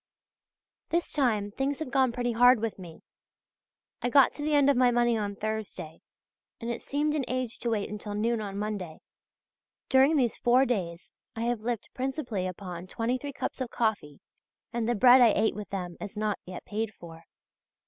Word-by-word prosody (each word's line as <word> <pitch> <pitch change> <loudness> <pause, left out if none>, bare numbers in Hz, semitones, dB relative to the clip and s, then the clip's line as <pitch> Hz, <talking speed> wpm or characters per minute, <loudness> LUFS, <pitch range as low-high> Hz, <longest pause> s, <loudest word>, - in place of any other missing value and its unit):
This 340 +1 0
time 220 -8 +1
things 270 +5 -1
have 315 -5 -5
gone 265 -2 +3
pretty 245 0 -1
hard 245 +1 +6
with 225 -2 -3
me; 170 -3 -11 1.0
I 245 - 0
got 275 +1 +5
to - - -8
the 300 0 +1
end 285 -1 +5
of 280 - +4
my 250 0 +4
money 240 -1 +2
on 205 -2 -2
Thursday, 215 -7 -5 0.6
and 230 +1 -3
it 235 - -5
seemed 295 +1 -1
an 300 -3 0
age 255 -2 -3
to 235 - -2
wait 215 -3 -1
until 210 0 -6
noon 225 +2 0
on 200 -1 -5
Monday. 200 -6 -4 0.9
During 270 +4 +5
these 245 -5 +1
four 250 +2 +4
days 180 -9 -3 0.2
I 225 - -4
have 235 -1 -1
lived 235 -1 -3
principally 255 -8 -3
upon 180 -1 -7
23{HH} 255 +7 -3
cups - - -4
of 255 - -2
coffee, 210 - -2 0.5
and 235 -1 -1
the 240 - +2
bread 250 +4 +7
I 230 -3 +6
ate 220 +1 +2
with 210 -1 -7
them 180 -3 -5
is 205 +1 -7
not 210 -1 -1
yet 185 -1 -8
paid 215 0 -3
for. 165 -1 -12
230 Hz, 185 wpm, -28 LUFS, 205-255 Hz, 1.0 s, bread